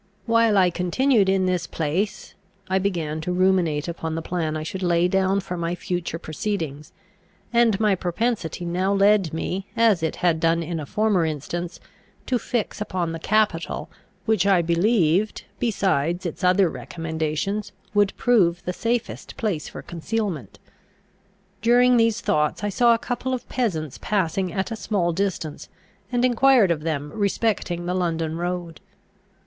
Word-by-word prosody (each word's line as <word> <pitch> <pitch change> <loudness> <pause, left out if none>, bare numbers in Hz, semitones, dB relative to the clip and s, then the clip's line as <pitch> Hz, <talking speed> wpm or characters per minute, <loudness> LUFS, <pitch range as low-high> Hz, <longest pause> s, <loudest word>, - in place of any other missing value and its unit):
While 230 -2 +3
I 185 -2 +4
continued 195 +5 +2
in 190 -1 +2
this 180 -1 0
place, 170 +6 -2 0.3
I 190 0 +1
began 165 -5 -2
to 180 - -3
ruminate 180 -5 +2
upon 165 -1 -4
the 165 - -3
plan 160 -3 -2
I 155 - -4
should 185 +4 -5
lay 175 -1 +3
down 190 +1 +1
for 180 -1 -5
my 170 +1 -2
future 175 -2 -3
proceedings; 155 -3 -4 0.6
and 235 -4 +4
my 210 -2 +3
propensity 180 -1 -2
now 180 +3 0
led 200 -3 +4
me, 185 +4 -3
as 225 -6 +4
it 160 - -1
had 170 -3 +1
done 165 +1 +2
in 165 0 -3
a 145 - -6
former 210 -2 +2
instance, 165 +3 -4 0.5
to 250 -2 0
fix 230 -4 -3
upon 180 -5 -2
the 165 - -5
capital, 205 -3 0 0.3
which 215 -4 +2
I 185 -3 +4
believed, 180 +2 +2
besides 185 - 0
its 170 +3 -5
other 185 +1 +4
recommendations, 165 +5 -3 0.2
would 205 -1 +2
prove 185 -8 +2
the 180 - -2
safest 230 +4 -3
place 200 -9 -2
for - - -9
concealment. 175 - -4 1.0
During 245 +2 +5
these 230 0 +2
thoughts 150 +6 0
I 205 - 0
saw 235 +4 +4
a - - -1
couple 250 +2 -2
of 250 - -8
peasants 165 - -2
passing 190 -2 0
at 190 +6 -2
a - - -2
small 195 -6 0
distance, 175 -5 -3 0.4
and 245 0 +2
enquired 250 -5 +5
of 155 -3 -1
them 150 -2 -3
respecting 200 -4 -1
the 180 - -1
London 165 -3 -1
road. 175 -1 -4
180 Hz, 155 wpm, -23 LUFS, 165-210 Hz, 1.0 s, During